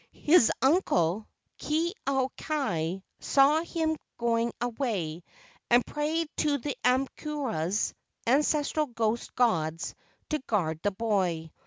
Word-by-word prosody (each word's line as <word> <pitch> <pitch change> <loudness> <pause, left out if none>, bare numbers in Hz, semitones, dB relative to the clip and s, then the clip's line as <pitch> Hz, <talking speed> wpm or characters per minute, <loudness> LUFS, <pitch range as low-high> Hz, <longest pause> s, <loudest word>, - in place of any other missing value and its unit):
His 305 -6 +6
uncle, 215 - +2 0.3
Ke 325 +4 0
au 265 -1 +1
kai, 190 - -2 0.2
saw 285 +3 +4
him 320 -1 -1 0.2
going 235 0 +1
away, 220 - -2 0.5
and 240 +1 +5
prayed 310 +2 -1
to 295 -2 +2
the 285 +1 -4
aumakuas 250 - 0 0.3
(ancestral 300 +3 +2
ghost 230 -1 -2
gods) 165 -10 +1 0.4
to 305 - +1
guard 175 - -1
the 205 - +2
boy. 190 -6 -1
245 Hz, 110 wpm, -28 LUFS, 195-295 Hz, 0.5 s, His